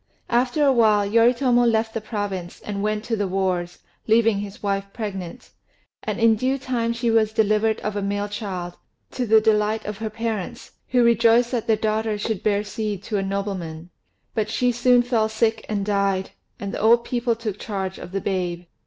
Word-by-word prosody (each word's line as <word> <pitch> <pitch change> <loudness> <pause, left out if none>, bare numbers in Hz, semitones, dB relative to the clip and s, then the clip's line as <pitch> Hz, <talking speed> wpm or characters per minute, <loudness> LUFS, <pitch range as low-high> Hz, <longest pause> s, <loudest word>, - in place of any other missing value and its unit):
After 250 +5 +2
a 275 - +5
while 215 -4 +4
Yoritomo 240 +3 +4
left 225 -1 +1
the 225 - -3
province, 205 -5 -4
and 200 -1 -4
went 210 0 -1
to 230 0 -1
the 205 -2 -1
wars, 180 -2 -1 0.3
leaving 225 -2 +4
his 205 0 -8
wife 195 -1 0
pregnant; 195 -6 -6 0.5
and - - -3
in 225 -1 +5
due 260 +5 0
time 245 -3 -1
she 235 0 0
was 220 -1 +3
delivered 220 0 +2
of 210 -1 -3
a 205 - -1
male 205 +1 -1
child, 190 -5 -5 0.3
to 250 -2 -3
the 220 +1 +6
delight 215 0 +1
of 210 -1 -5
her 220 -1 -3
parents, 220 -3 -4 0.2
who 250 -1 +3
rejoiced 235 +1 +4
that 240 -2 -2
their 225 - +4
daughter 215 0 -1
should 210 -1 -2
bear 205 -1 +1
seed 210 -1 -4
to 210 +1 -2
a - - 0
nobleman; 190 -4 -4 0.4
but 215 -1 -1
she 245 +3 +1
soon 245 +1 +4
fell 230 -3 +1
sick 220 0 0
and 205 -2 -1
died, 200 -2 0 0.3
and 200 -1 -5
the - - -3
old 235 +2 +5
people 240 -1 0
took 220 -3 -5
charge 190 -3 -4
of 180 - -9
the 195 0 -2
babe. 180 -3 -2
215 Hz, 190 wpm, -23 LUFS, 200-230 Hz, 0.5 s, the